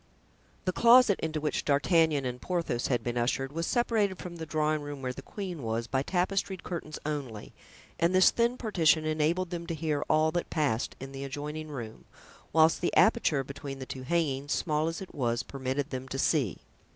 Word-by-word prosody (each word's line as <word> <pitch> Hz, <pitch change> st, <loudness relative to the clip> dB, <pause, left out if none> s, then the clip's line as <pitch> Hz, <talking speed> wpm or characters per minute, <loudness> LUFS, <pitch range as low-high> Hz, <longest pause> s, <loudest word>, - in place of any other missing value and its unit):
The 185 Hz, -, +2 dB
closet 235 Hz, -2 st, +6 dB
into 160 Hz, -1 st, -2 dB
which 150 Hz, 0 st, -1 dB
D'Artagnan 150 Hz, 0 st, +3 dB
and 125 Hz, 0 st, -4 dB
Porthos 170 Hz, -9 st, -1 dB
had 120 Hz, -4 st, 0 dB
been 120 Hz, +1 st, -1 dB
ushered 135 Hz, +3 st, 0 dB
was 165 Hz, +1 st, -2 dB
separated 220 Hz, -6 st, +1 dB
from 175 Hz, -1 st, -8 dB
the 160 Hz, -1 st, -6 dB
drawing 155 Hz, -1 st, 0 dB
room 145 Hz, -2 st, -7 dB
where 125 Hz, 0 st, -2 dB
the 135 Hz, -, -8 dB
queen 180 Hz, -2 st, -6 dB
was 115 Hz, 0 st, -2 dB
by 130 Hz, +2 st, 0 dB
tapestried 190 Hz, +3 st, -1 dB
curtains 160 Hz, -3 st, -5 dB
only, 135 Hz, -8 st, -4 dB, 0.5 s
and 170 Hz, +1 st, +3 dB
this 185 Hz, -, +7 dB
thin 235 Hz, +1 st, +1 dB
partition 165 Hz, -9 st, +2 dB
enabled 160 Hz, +4 st, 0 dB
them 170 Hz, -1 st, -4 dB
to 165 Hz, -, -2 dB
hear 155 Hz, -2 st, -1 dB
all 155 Hz, +1 st, +3 dB
that 175 Hz, +1 st, -2 dB
passed 140 Hz, -7 st, 0 dB
in 135 Hz, +1 st, -7 dB
the 135 Hz, 0 st, -6 dB
adjoining 150 Hz, +3 st, -5 dB
room, 120 Hz, -7 st, -7 dB, 0.5 s
whilst 160 Hz, +1 st, +4 dB
the 175 Hz, -, 0 dB
aperture 190 Hz, -11 st, +4 dB
between 140 Hz, +1 st, -7 dB
the 130 Hz, -, -6 dB
two 130 Hz, -, -7 dB
hangings, 145 Hz, -1 st, 0 dB
small 155 Hz, -1 st, 0 dB
as 165 Hz, +2 st, -3 dB
it 190 Hz, -, -9 dB
was, 120 Hz, -4 st, 0 dB
permitted 135 Hz, +2 st, -3 dB
them 130 Hz, 0 st, -4 dB
to 135 Hz, -, -4 dB
see. 135 Hz, -, +1 dB
155 Hz, 190 wpm, -29 LUFS, 135-170 Hz, 0.5 s, this